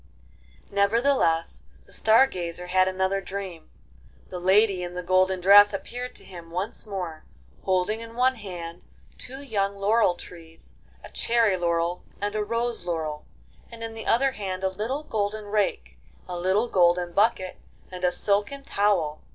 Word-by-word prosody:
V - - -29
Nevertheless, 200 -5 +2 0.2
the - - -17
Star 225 +4 +5
Gazer 180 -6 -4
had 185 +1 +3
another 190 +1 0
dream. 190 -4 -7 0.6
The 180 - -5
lady 190 +1 +3
in 175 0 -5
the 180 - -4
golden 185 +1 +2
dress 205 +2 +7
appeared 245 +6 -6
to - - -7
him 170 -3 -11
once 185 +6 -5
more, 180 -6 -5 0.4
holding 190 +4 +1
in 230 0 -9
one 255 +2 +3
hand 175 -7 -8 0.4
two 265 +2 -6
young 200 -6 -1
laurel 205 -2 +3
trees, 165 -2 -13 0.3
a - - -11
cherry 230 -4 +3
laurel 170 0 0 0.2
and 205 +1 -2
a 215 0 0
rose 230 +2 -2
laurel, 160 -3 -3 0.4
and 230 0 -9
in 225 0 -5
the 225 0 -7
other 270 +4 +3
hand 190 -5 -5
a 190 - +2
little 225 +10 -3
golden 215 -4 -2
rake, 205 -1 -1 0.3
a 180 - -5
little 190 +6 +1
golden 175 -3 +2
bucket, 200 -2 +1 0.3
and 180 0 -8
a 180 - +3
silken 205 +9 -1
towel. 195 - +1
195 Hz, 160 wpm, -26 LUFS, 180-220 Hz, 0.6 s, dress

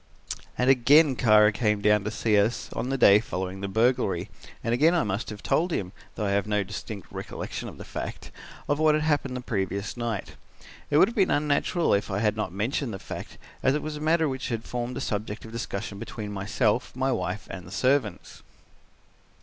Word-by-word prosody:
"And 125 - +1
again 135 +3 +6
Kara 110 -3 +5
came 105 -1 +1
down 105 0 +3
to - - 0
see 110 -1 +1
us 105 +4 +1
on 125 +3 -3
the 135 - 0
day 100 -5 +7
following 95 -2 -4
the 100 - -2
burglary, 110 -3 +1 0.3
and 115 - 0
again 155 +8 +4
I 170 - +3
must 100 +2 -2
have 105 -1 -8
told 175 +3 +1
him, 95 - -2 0.2
though 105 - -2
I 100 - 0
have 100 0 +1
no 105 -1 +1
distinct 100 0 -7
recollection - - -5
of - - -12
the - - -9
fact, - - -6 0.4
of 145 +1 +1
what 155 -1 +4
had 155 - 0
happened 145 -4 0
the - - -5
previous 100 -3 -2
night. 115 -4 -3 0.6
It 145 - +3
would 185 - +7
have 235 - -5
been 195 -3 +3
unnatural 150 +4 +1
if 100 0 +1
I 95 - -1
had 105 0 +1
not 110 -5 -2
mentioned 110 - -2
the - - -5
fact, - - -8 0.2
as 130 +2 +3
it 150 - -2
was 155 0 -4
a - - -6
matter 160 +1 +3
which 130 -2 -3
had 115 -2 -2
formed 120 0 -4
a - - -3
subject 105 +1 -3
of 110 - -10
discussion 105 -3 -5
between 105 -1 -6
myself, 105 +4 0
my 130 +1 +1
wife 90 -1 -2
and 90 -2 -8
the - - -11
servants. 125 -3 0
110 Hz, 210 wpm, -26 LUFS, 100-135 Hz, 0.6 s, day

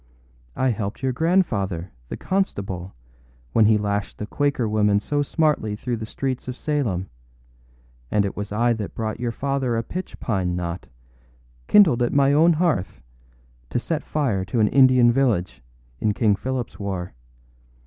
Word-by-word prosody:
I 130 - +1
helped 110 0 -3
your 130 - +1
grandfather, 110 - 0 0.2
the - - -5
constable, 95 - -2 0.6
when 110 - +5
he 110 0 +5
lashed 105 -1 -2
the 105 - -4
Quaker 140 -1 0
woman 105 -1 +2
so 145 +7 -1
smartly 145 -8 0
through 120 +2 -3
the 110 0 -6
streets 130 +1 -3
of 125 0 -5
Salem; 120 - -1 1.0
and 100 +5 +2
it 100 - -4
was 105 0 -5
I 120 +3 +2
that 110 -3 -6
brought 110 0 -3
your 120 -1 -1
father 135 -1 -1
a 115 - -1
pitch 185 +9 -6
pine 95 -6 -1
knot, 85 0 -4 0.8
kindled 170 - +5
at 120 - +1
my 140 0 +4
own 165 +3 +5
hearth, 155 - 0 0.7
to - - -1
set 155 +5 -2
fire 125 -11 -1
to 105 +5 -2
an 105 -1 +4
Indian 130 -3 +6
village, 100 - 0 0.4
in 105 -2 0
King 110 -4 +3
Philipâs 125 0 -4
war. 95 -3 -4
115 Hz, 160 wpm, -23 LUFS, 100-135 Hz, 1.0 s, Indian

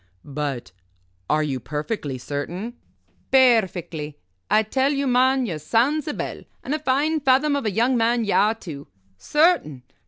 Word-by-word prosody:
"But 140 -3 -4 0.6
are 155 0 +2
you 135 -4 -2
perfectly 150 - -4
certain?" 165 - -5 0.6
"Perfectly. 185 - +2 0.3
I 215 - +4
tell 265 +6 +1
you, 280 -1 -1
man, 260 +1 +3
you're 165 -8 -4
sound's 265 - +1
a 300 - -2
bell, - - -5 0.2
and 275 - -3
a 305 - -1
fine 300 +3 +1
fathom 280 +1 +3
of 280 -6 -2
a - - 0
young 235 +6 +2
man 230 0 +1
ye 205 - -1
are, 215 +2 +3
too. 155 -10 -9 0.3
Certain? 300 - +1
225 Hz, 155 wpm, -23 LUFS, -, 0.6 s, I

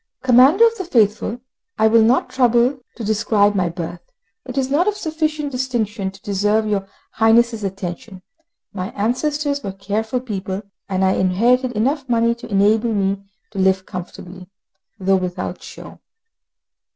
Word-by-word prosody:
Commander 260 - +6
of 460 0 +2
the - - -2
Faithful, 220 - +1 0.4
I 220 - +3
will 225 +1 +5
not 235 +4 +2
trouble 250 +1 +2 0.2
to 235 - -7
describe 210 -1 +2
my 185 -3 0
birth; 170 0 -6 0.5
it 255 +1 -7
is 265 -1 +1
not 330 +7 +2
of 420 -1 0
sufficient 310 -4 -2
distinction 230 -6 -2
to 195 0 -15
deserve 210 +1 +1
your 200 -2 -1 0.2
Highness' 225 0 +3
attention. 190 0 -6 0.5
My 190 -1 -4
ancestors 285 +6 -1
were 195 -2 -5
careful 210 +5 -2
people, 200 -4 -5 0.3
and 190 0 +1
I 190 - +3
inherited 240 +7 +2
enough 265 +5 -1
money 235 0 +2
to 235 - -11
enable 215 +3 +2
me 195 -1 0 0.3
to 200 - -6
live 190 0 +2
comfortably, 180 0 -9 0.5
though 195 0 +2
without 180 -1 -4
show. - - -11
220 Hz, 150 wpm, -20 LUFS, 195-250 Hz, 0.5 s, Commander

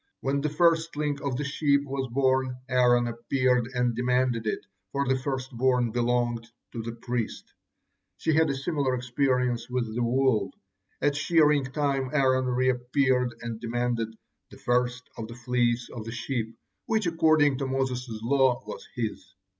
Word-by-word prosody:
When 140 +1 0
the 150 - 0
firstling 155 -3 +1
of 135 -3 -2
the 145 - -2
sheep 140 0 +2
was 135 -1 -3
born, 130 -1 +1
Aaron 125 -1 +4
appeared 125 +1 +1
and 125 -1 +1
demanded 125 -2 +1
it, 105 - -2 0.3
for 140 0 -1
the 130 - +3
firstborn 130 -2 0
belongs 120 -1 0 0.2
to 115 - -5
the 115 +1 -5
priest. 120 -1 -4 0.6
She 160 - 0
had 160 0 +4
a 140 - 0
similar 135 -2 0
experience 125 -1 0
with 120 -3 -2
the 120 - -1
wool. 120 -4 +2 0.5
At 145 -1 +3
shearing 150 -2 +3
time 135 -1 -1
Aaron 130 -3 +3
reappeared 125 0 +1
and 115 -1 -5
demanded 120 -1 -1 0.3
'the - - -13
first 125 0 0
of 110 - -4
the 115 - -9
fleece 120 0 0
of 115 - -6
the 115 - -5
sheep,' 115 -1 -3 0.3
which, 220 -2 +1
according 155 -4 +3
to 135 - -1
Moses' 130 -1 -2
law, 130 0 +3
was - - -8
his. 105 -5 -4
125 Hz, 155 wpm, -27 LUFS, 120-140 Hz, 0.6 s, Aaron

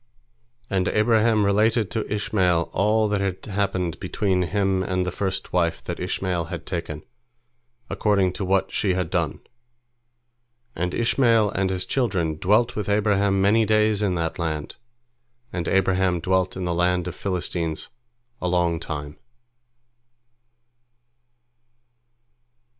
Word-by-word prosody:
And 95 -2 0
Abraham 110 -1 +3
related 105 +2 +2
to 110 -3 -3
Ishmael 95 -5 +1
all 110 +2 +2
that 105 -1 0
had 95 -2 -3
happened 95 -5 -2
between 95 0 0
him 95 +1 0
and 90 0 -1
the 90 - -2
first 95 +1 -3
wife 85 -2 +1
that - - -5
Ishmael 90 -1 -2
had 85 0 -7
taken, 85 -4 -5 0.8
according 100 -4 +1
to 95 - -4
what 95 +1 +1
she 95 -3 0
had 90 -2 -2
done. 85 -5 -1 1.3
And 90 +1 -2
Ishmael 115 -3 +3
and 95 0 0
his 95 -1 -2
children 95 - 0
dwelt 110 +8 +2
with 105 -2 -3
Abraham 100 -2 +2
many 110 +3 +4
days 110 -1 +2
in 95 -3 +1
that 85 0 -2
land, 80 -3 -3 0.8
and 85 -2 -3
Abraham 95 -2 +2
dwelt 95 +1 0
in 95 - -3
the 85 - 0
land 90 +1 +1
of 90 - -4
the - - -19
Philistines 85 -4 -3 0.5
a 90 - -1
long 85 -2 +1
time. 75 -3 -6
95 Hz, 130 wpm, -24 LUFS, 90-105 Hz, 1.3 s, many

